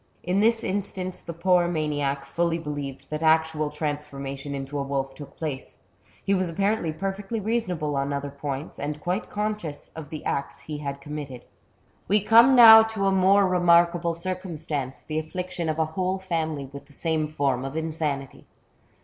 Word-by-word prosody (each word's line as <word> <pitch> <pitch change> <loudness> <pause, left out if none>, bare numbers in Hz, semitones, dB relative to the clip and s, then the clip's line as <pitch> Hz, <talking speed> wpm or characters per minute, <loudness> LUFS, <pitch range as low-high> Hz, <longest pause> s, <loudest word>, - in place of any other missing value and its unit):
In 180 +2 +1
this 225 +2 +3
instance 185 -1 -3
the 170 - -7
poor 175 +1 +2
maniac 145 -4 -1
fully 170 -1 0
believed 145 -4 -5
that 155 0 -3
actual 160 -1 +2
transformation 145 -2 -4
into 135 +1 -4
a - - 0
wolf 135 -1 -2
took 145 -1 -11
place; 145 -5 -5 0.5
he 200 - +2
was 185 -2 +1
apparently 195 0 0
perfectly 195 +6 -4
reasonable 185 -9 -1
on 140 +1 -1
other 140 0 -3
points, 140 +1 -5
and 150 +1 -3
quite 180 +6 -2
conscious 210 -8 -4
of 160 -3 -8
the 155 -1 -7
acts 140 - -3
he 150 -1 -6
had 140 -1 -5
committed. 145 -4 -7 0.6
We 210 +2 +4
come 230 +5 +6
now 225 -2 +11
to 220 -3 -1
a 195 - +3
more 195 +1 +5
remarkable 170 -1 +3
circumstance, 165 -7 -4
the 155 0 -3
affliction 175 +1 -4
of 155 - -1
a 160 - +2
whole 185 +2 0
family 160 -6 -2
with 140 0 -10
the 145 - -17
same 160 0 0
form 140 -4 0
of 135 +3 -5
insanity. 155 -4 -3
160 Hz, 165 wpm, -25 LUFS, 145-185 Hz, 0.6 s, now